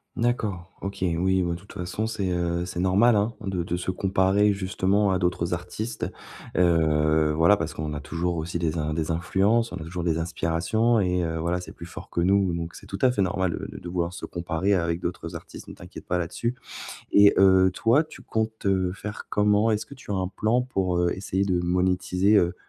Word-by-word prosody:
D'accord, 105 -7 -1
OK, 100 +1 -5
oui, 90 +2 +1
ouais. 85 -1 -1
De 85 - -6
toute 100 - -15
façon, 90 +5 -3
c'est, 100 -5 -2
heu, 85 0 -1
c'est 90 -1 -5
normal, 100 +6 +4
hein! 105 +3 +1
De 95 -4 -2
de 85 +1 -2
se 90 +1 -2
comparer 95 +2 +2
justement 100 +1 +1
à 95 - +1
d'autres 90 -1 0
artistes. 90 +7 -4 0.5
Heu, 80 -3 +3
voilà, 85 +5 +6
parce 80 -5 -4
qu'on 75 -1 -4
a 75 - -4
toujours 85 +3 -2
aussi 85 +2 -3
des 85 -1 -1
in 75 0 -2
des 80 0 -1
influences, 100 +8 +1
on - - -5
a 80 - -7
toujours 85 +2 -5
des 80 -2 +1
inspirations 85 +8 +1
et 90 -2 +1
heu, 80 0 -2
voilà, 85 +2 -1
c'est - - -9
plus 85 - -10
fort 85 - -10
que 85 - -1
nous 95 0 +3
donc 85 0 -5
c'est - - -12
tout 95 - -5
à 130 - +6
fait 105 -5 0
normal 95 -1 0
de - - -5
de - - -9
de 85 - -8
vouloir 85 -1 -1
se 90 - -7
comparer 85 +3 -1
avec 85 -2 0
d'autres 85 -1 -5
artistes, - - -10
ne - - -9
t'inquiète - - -11
pas 90 - +1
là-dessus. 90 +8 -2 0.6
Et 100 0 +7
heu, 95 -1 +6
toi, 115 - +3
tu 155 -4 -13
comptes, 110 -1 -3
heu, 95 -2 +2
faire 105 +1 -7
comment? 105 +2 +3
Est-ce 105 0 0
que 140 - -12
tu 125 - -13
as - - 0
un 95 -1 -1
plan 110 +5 +1
pour, 95 -8 -1
heu, 85 0 +2
essayer 95 0 -1
de 90 -3 +1
monétiser, 90 +3 +2
heu, 90 -2 +3
90 Hz, 220 wpm, -25 LUFS, 85-100 Hz, 0.6 s, Et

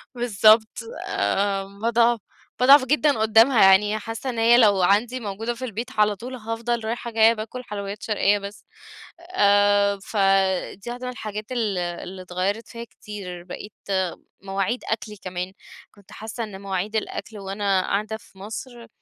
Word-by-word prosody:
بالضبط 220 -2 +4 0.4
آآ، 195 - 0 0.2
باضعف 235 0 +3 0.4
باضعف 265 +1 +7
جدًا 295 -1 +2
قدامها 225 +3 +5
يعني 205 +3 +5
حاسّة 225 +5 -5
إن 235 -2 -3
هي 235 +1 +6
لو 205 -5 +5
عندي 220 +7 +2
موجودة 225 +2 -4
في 260 - -5
البيت 230 +1 -5
على 210 -1 +4
طول 250 +6 -8
هافضل 230 0 -3
رايحة 235 +1 -4
جايّة 225 0 +5
باكل 230 +3 -7
حلويّات 200 -2 -6
شرقيّة 205 -1 +2
بس، 200 +1 -9 0.7
آآ، 205 0 +4
ف 215 - -6 0.6
دي 200 +5 -10
واحدة 245 +1 -6
من 250 - -3
الحاجات 215 -1 -7
ال 220 -6 -1
اللي 180 +1 -5
اتغيرت 185 +5 -3
فيا 230 0 -8
كتير، 195 -4 -9
بقيت 195 +3 -9 0.7
مواعيد 195 +5 -2
أكلي 215 -1 -3
كمان، 185 0 -5 0.4
كنت 200 -2 -21
حاسّة 220 +2 -6
إن 200 -3 -8
مواعيد 195 +2 -3
الأكل 220 0 -4
وأنا 195 -1 0
قاعدة 215 +3 -2
في 200 - -22
مصر 230 +4 -8
215 Hz, 150 wpm, -23 LUFS, 200-235 Hz, 0.7 s, باضعف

